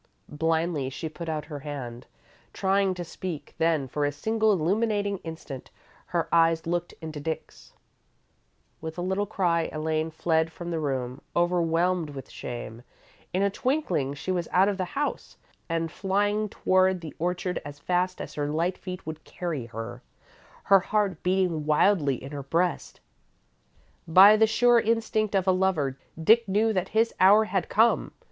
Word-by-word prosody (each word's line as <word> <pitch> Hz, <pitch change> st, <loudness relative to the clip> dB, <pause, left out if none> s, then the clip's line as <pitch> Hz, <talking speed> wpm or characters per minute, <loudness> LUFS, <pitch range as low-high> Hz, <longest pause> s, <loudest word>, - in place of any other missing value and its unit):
Blindly, 160 Hz, -2 st, 0 dB
she 135 Hz, +4 st, -5 dB
put 165 Hz, +2 st, -7 dB
out 155 Hz, -1 st, -3 dB
her 150 Hz, -3 st, -7 dB
hand, 135 Hz, -5 st, -7 dB, 0.5 s
trying 195 Hz, 0 st, +1 dB
to 175 Hz, -, -4 dB
speak; 170 Hz, -2 st, -6 dB
then, 160 Hz, -4 st, +2 dB
for 145 Hz, +3 st, -2 dB
a 145 Hz, -, +1 dB
single 220 Hz, +9 st, +1 dB
illuminating 200 Hz, +2 st, 0 dB
instant, 160 Hz, -6 st, -8 dB, 0.4 s
her -, -, -1 dB
eyes 165 Hz, -1 st, +4 dB
looked 175 Hz, +1 st, -2 dB
into 155 Hz, -2 st, -6 dB
Dick's. 160 Hz, +2 st, -6 dB, 1.1 s
With 160 Hz, +1 st, -6 dB
a 175 Hz, -, -2 dB
little 190 Hz, +3 st, -1 dB
cry, 170 Hz, -5 st, +1 dB
Elaine 155 Hz, +1 st, -1 dB
fled 160 Hz, 0 st, 0 dB
from 175 Hz, +1 st, -7 dB
the 165 Hz, -, -1 dB
room, 130 Hz, -3 st, -3 dB
overwhelmed 175 Hz, -1 st, +1 dB
with 135 Hz, -2 st, -9 dB
shame. 120 Hz, -1 st, -7 dB, 0.5 s
In 185 Hz, +2 st, +1 dB
a 200 Hz, -, +2 dB
twinkling, 210 Hz, -, -1 dB
she 165 Hz, +6 st, -4 dB
was 175 Hz, -2 st, -1 dB
out 190 Hz, +2 st, +4 dB
of 200 Hz, -1 st, -1 dB
the 185 Hz, -, 0 dB
house, 290 Hz, 0 st, -3 dB, 0.3 s
and 165 Hz, -1 st, -1 dB
flying 205 Hz, +3 st, 0 dB
toward 185 Hz, -1 st, +2 dB
the 155 Hz, -4 st, -8 dB
orchard 180 Hz, +1 st, -2 dB
as 145 Hz, 0 st, -8 dB
fast 180 Hz, +4 st, -1 dB
as 140 Hz, -, -6 dB
her 145 Hz, 0 st, -2 dB
light 170 Hz, +4 st, -1 dB
feet 185 Hz, -1 st, -7 dB
would 155 Hz, 0 st, -7 dB
carry 155 Hz, -9 st, -4 dB
her, 115 Hz, +2 st, -7 dB, 0.6 s
her 195 Hz, 0 st, +6 dB
heart 200 Hz, -3 st, -1 dB
beating 180 Hz, -5 st, 0 dB
wildly 155 Hz, -2 st, +3 dB
in 135 Hz, -, -8 dB
her 145 Hz, -1 st, -5 dB
breast. 170 Hz, +6 st, -1 dB, 1.1 s
By 190 Hz, +6 st, +8 dB
the 220 Hz, +1 st, +4 dB
sure 240 Hz, +2 st, +4 dB
instinct 220 Hz, -2 st, 0 dB
of 190 Hz, -2 st, +2 dB
a -, -, +6 dB
lover, 185 Hz, -8 st, +1 dB, 0.2 s
Dick 225 Hz, +7 st, +5 dB
knew 215 Hz, +3 st, +2 dB
that 185 Hz, -1 st, -1 dB
his 225 Hz, +1 st, +2 dB
hour 200 Hz, +4 st, +7 dB
had 200 Hz, -4 st, -2 dB
come. 225 Hz, +2 st, +3 dB
175 Hz, 160 wpm, -27 LUFS, 155-195 Hz, 1.1 s, By